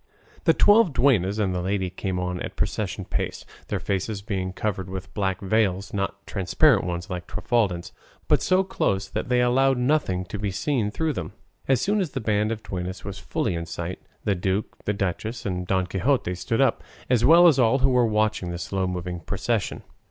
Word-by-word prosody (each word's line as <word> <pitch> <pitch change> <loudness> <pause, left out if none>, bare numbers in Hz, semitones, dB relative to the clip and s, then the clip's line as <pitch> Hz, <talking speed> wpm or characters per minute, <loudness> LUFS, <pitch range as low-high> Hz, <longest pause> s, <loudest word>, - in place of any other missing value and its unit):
The - - +5
twelve 205 -6 +5
duennas 105 -8 +3
and 100 -4 0
the 90 - -1
lady 95 0 -1
came 95 0 -3
on 90 0 -2
at - - -5
procession - - -2
pace, - - -3 0.2
their - - -2
faces 100 +1 -2
being 95 -3 -2
covered 95 -1 -3
with 95 0 -7
black 95 -3 -1
veils, 100 -1 0
not 100 0 -3
transparent 100 - +3
ones 90 +2 -4
like 90 -1 -5
Trifaldin's, 100 -8 0 0.4
but - - +3
so 185 +1 +3
close 100 - -1
that - - -4
they 125 -1 +3
allowed 130 +2 +3
nothing 125 -9 +1
to 100 +4 -6
be 105 0 -1
seen 110 +2 0
through 160 +8 -1
them. - - -5 0.3
As 130 -2 +3
soon 205 +1 +1
as 170 -6 -3
the 135 - -2
band 105 -1 +1
of 110 -1 -4
duennas 90 0 -5
was 100 -1 -6
fully - - -2
in 85 0 -4
sight, 85 +2 -5 0.2
the 105 - +2
duke, 95 +3 -2
the 105 - +1
duchess, 105 +4 -3
and 90 -2 -2
Don 95 -1 +1
Quixote 95 +1 0
stood 115 +7 -1
up, 135 - +2 0.2
as 120 -2 +2
well 170 +3 +7
as 145 -5 +4
all 120 +1 +4
who 135 0 +2
were 125 -1 +4
watching 110 -4 0
the 85 - -4
slow 95 +2 -2
moving 90 -1 -4
procession. 100 +5 -2
100 Hz, 195 wpm, -25 LUFS, 95-125 Hz, 0.4 s, well